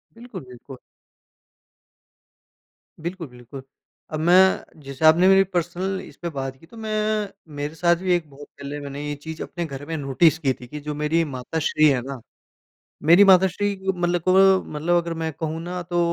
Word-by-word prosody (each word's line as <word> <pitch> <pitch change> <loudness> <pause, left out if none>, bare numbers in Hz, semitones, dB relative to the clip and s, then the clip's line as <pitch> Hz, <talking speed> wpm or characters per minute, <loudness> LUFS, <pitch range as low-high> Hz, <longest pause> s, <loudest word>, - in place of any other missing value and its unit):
बिल्कुल, 230 -6 -9
बिल्कु 125 +1 -12 2.3
बिल्कुल, 175 -2 -5
बिल्कुल। 125 +2 -11 0.5
अब 155 - -2
मैं 185 -2 +3
जैसे 140 +3 -3
आपने 170 +4 +6
मेरी 195 0 +6
पर्सनल 180 +3 -2
इस - - -13
पे 170 - -3
बात 135 0 -4
की 165 - -18
तो 230 - -16
मैं 215 -1 -1 0.3
मेरे 145 +1 -4
साथ 170 +1 +3
भी 180 -1 +2
एक 160 -4 -4
बहुत 145 +1 -13
पहले 140 +1 -8
मैंने 140 0 -7
ये 145 - -3
चीज़ 160 0 -7
अपने 170 -1 -5
घर 140 -1 -8
में 165 - -4
नोटिस 145 +4 +3
की 130 - +3
थी 125 - -11
कि 150 - -7
जो 150 - -3
मेरी 160 +2 +2
माताश्री 155 +3 +1
हैं 130 -3 +1
ना 135 0 -7 0.9
मेरी 175 +4 +8
माताश्री 190 +1 +4
क 190 0 -2
मतलब 175 0 0
को 190 0 +5
मतलब 160 +4 0
अगर 170 0 -5
मैं 160 - -2
कहूँ 160 0 -3
ना 180 +1 -5
तो 175 -1 0
165 Hz, 180 wpm, -23 LUFS, 145-185 Hz, 2.3 s, मेरी